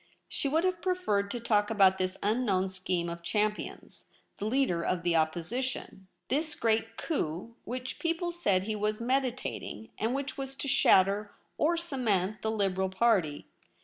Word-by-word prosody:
She 280 - -1
would 320 +4 +2
have 365 -2 0
preferred 360 - 0
to 240 - -3
talk 210 -3 +2
about 195 -3 +5
this 185 0 -1
unknown 205 -4 +1
scheme 185 -2 -2
of 170 0 -5
Champion's, 210 +4 -2 0.3
the 205 - -2
leader 240 -8 +2
of 175 0 -1
the 175 -1 +2
Opposition 185 +6 -1
— - - -51
this 305 +3 0
great 225 0 0
coiip 185 - -2
which 255 +1 -5
people 335 +1 -1
said 200 - +1
he 215 +2 -2
was 210 0 -1
meditating, 250 - -2
and 225 +4 0
which 275 0 -4
was 270 0 -4
to 280 - -4
shatter 205 -5 +4 0.2
or 335 +3 +2
cement 220 - 0
the 220 - -1
Liberal 190 -3 0
Party. 190 -7 +2
215 Hz, 160 wpm, -30 LUFS, 190-265 Hz, 0.3 s, about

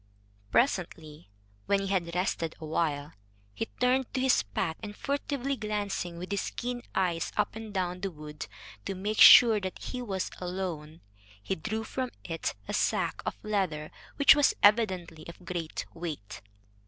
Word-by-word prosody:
Presently, 165 - 0 0.4
when 200 -1 +3
he 195 - -3
had 175 -3 -1
rested 175 -3 -1
awhile, 155 -2 -2 0.4
he 225 - -3
turned 255 0 +2
to - - +1
his 260 0 +4
pack, 160 - -3
and, 205 -1 -7
furtively 280 -1 -2
glancing 205 -6 -3
with 180 +3 -7
his 200 - -1
keen 245 0 -3
eyes 175 -3 0
up - - 0
and 220 -1 -7
down 180 -2 -2
the 195 - -1
wood, 150 -3 -8 0.4
to 195 - -3
make 205 +3 -2
sure 225 -3 +10
that 185 -2 -5
he 250 - -5
was 195 -6 -3
alone, 175 -4 -5 0.4
he - - -1
drew 215 +6 -3
from 255 +2 -3
it 165 -1 -3
a - - -4
sack - - 0
of - - -2
leather 185 -8 -1 0.2
which 285 +1 +7
was 290 -1 +4
evidently 185 -7 +3
of 170 +1 -12
great 170 -3 -4
weight. 155 - -6
190 Hz, 155 wpm, -29 LUFS, 165-220 Hz, 0.4 s, sure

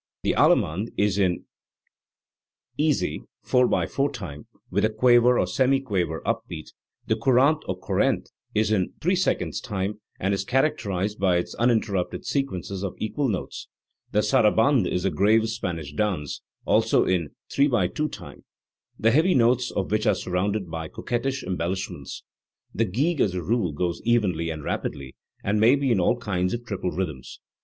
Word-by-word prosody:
The - - +2
alleniande 95 +9 +2
is 100 -1 +1
in 90 -3 +1 1.3
easy 150 -2 0 0.2
4 125 0 +3
/4 140 +1 0
time, 90 - -8 0.2
with - - +1
a 110 - +4
quaver 120 +2 +4
or - - +2
semiquaver 100 - 0
up - - 0
beat; 80 -3 -8 0.3
the 110 - +1
courante 130 +6 +3
or - - -2
corrente - - 0 0.2
is 110 0 +2
in 95 -4 0
3 180 +4 +1
/2 185 0 0
time, 105 0 -3 0.2
and 95 +2 0
is 100 - -1
characterised 105 -6 0
by 95 -2 +3
its 85 - -3
uninterrupted 110 -6 0
sequences 100 -9 -2
of 95 - -3
equal 135 +6 -1
notes; 100 - -4 0.4
the 105 - +2
sara 105 0 +4
bande 115 -4 +3
is 90 - -1
a 95 - +2
grave 110 +3 +3
Spanish 85 -10 -4
dance, 85 -5 -2 0.2
also - - +3
in 85 -5 0 0.2
3 140 +1 +4 0.2
/ - - -18
2 150 0 -1
time, - - -11 0.5
the 110 +1 +3
heavy 160 +8 +4
notes 125 0 +3
of 95 -1 -3
which 110 0 +1
are 100 - +4
surrounded 90 +1 -2
by 80 -1 -4
coquettish 130 - -3
embellish 95 +1 -2
ments; - - -8 0.5
the 115 - +1
gigue 145 - 0
as 95 -3 +1
a 90 - -3
rule 105 -2 0
goes 85 +3 -2
evenly 95 -9 +1
and 80 -2 -5
rapidly, 70 -1 -4 0.3
and 105 +2 +1
may 115 +5 +6
be 140 -2 0
in 100 - +3
all 90 +7 +2
kinds 95 -4 -1
of 120 0 -8
triple 100 -5 -3
rhythms. 80 -8 -5
105 Hz, 165 wpm, -25 LUFS, 90-120 Hz, 1.3 s, may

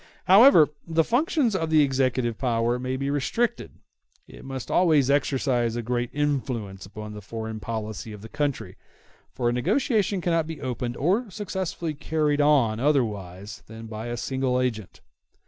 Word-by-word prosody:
However 195 - +7 0.2
the 165 0 +2
functions 255 - +1
of 165 -4 -1
the 155 -1 +5
executive 130 -4 0
power 120 -1 0
may 130 +1 -3
be 140 +1 -2
restricted, 200 - -1 0.5
it - - -13
must 135 -2 -6
always 155 -7 +4
exercise 130 -5 +1
a 120 - -3
great 120 +1 -1
influence 125 -10 -2
upon 105 +1 -8
the 105 - -8
foreign 110 +1 -6
policy 110 0 -5
of 105 -1 -10
the - - -7
country, 145 +1 -3 0.5
for 125 -2 -2
a 120 - +2
negotiation 205 - +1
cannot 165 -2 0
be 160 -1 -6
opened 125 -2 -4
or 200 - +1
successfully 190 -4 -4
carried 150 0 0
on 135 -7 +3
otherwise 105 -7 -1
than 110 +1 -10
by 110 +1 -6
a 120 0 -4
single 130 0 -1
agent. 115 -6 -3
130 Hz, 155 wpm, -25 LUFS, 115-155 Hz, 0.5 s, However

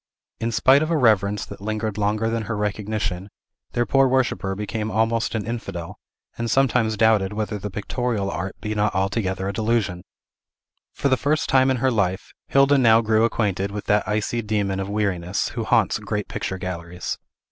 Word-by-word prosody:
In 115 +1 -1
spite 130 +5 +5
of 155 - -1
a 165 - +2
reverence 105 -5 +2
that - - -11
lingered 110 0 -2
longer 105 +2 0
than 115 -1 -1
her 110 +1 -3
recognition, 105 -2 -2 0.4
their 120 - +1
poor 135 +1 +4
worshipper 125 -7 0
became 105 +2 -3
almost 115 +1 0
an 105 -3 -2
infidel, 100 -7 -5 0.4
and 115 0 -1
sometimes 115 -3 +2
doubted 105 -3 +3
whether 105 0 -3
the 105 - -5
pictorial 105 0 -2
art 95 +2 -4
be 105 - -3
not 105 -1 0
altogether 95 0 -1
a 100 - -2
delusion. 105 -5 0 0.9
For - - -1
the 130 -1 +3
first 145 +4 0
time 130 -1 +4
in 130 - +2
her 130 +2 +2
life, 100 -4 -1
Hilda 140 +1 +4
now 115 -2 +6
grew 110 0 +3
acquainted 100 -4 0
with 105 0 -6
that 105 -2 +2
icy 105 +3 -1
demon 105 -3 -1
of 95 0 -3
weariness, 100 -3 -1
who - - -4
haunts - - +2
great - - -3
picture 95 - -4
galleries. 90 -1 -5
105 Hz, 180 wpm, -23 LUFS, 100-115 Hz, 0.9 s, now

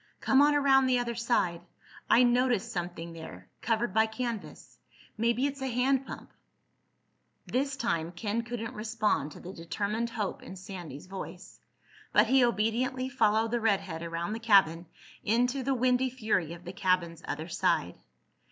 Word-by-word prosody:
"Come 270 +1 +4
on 295 0 +5
around 270 -2 +4
the 255 -1 +3
other 240 -1 -1
side. 225 -8 0 0.5
I 245 - +6
noticed 245 -3 +2
something 175 -1 -5
there—covered 165 - -4
by 220 +1 +4
canvas. 230 -1 -6 0.4
Maybe 235 +3 +1
it's 280 -1 -3
a 265 - -1
hand 260 +2 +1
pump." - - -9 1.1
This 275 +2 -1
time 170 -10 -1
Ken 210 +6 -2
couldn't 235 0 -5
respond 215 - -1
to - - -11
the 185 - -9
determined 205 +7 -2
hope 215 -4 -3
in 190 - -9
Sandy's 180 -7 -8
voice. 190 -1 -9 0.5
But - - +6
he 265 -1 +4
obediently 245 +3 0
followed 225 -3 +2
the 240 -1 0
redhead 195 -6 0
around 170 +3 -3
the 225 - -4
cabin 190 -7 +4 0.4
into 245 +5 +1
the 265 +1 0
windy 255 +1 +2
fury 215 -10 -1
of 175 +1 -12
the 180 - -6
cabin's 180 -3 0
other 160 - -4
side. 170 - 0
225 Hz, 150 wpm, -29 LUFS, 185-250 Hz, 1.1 s, I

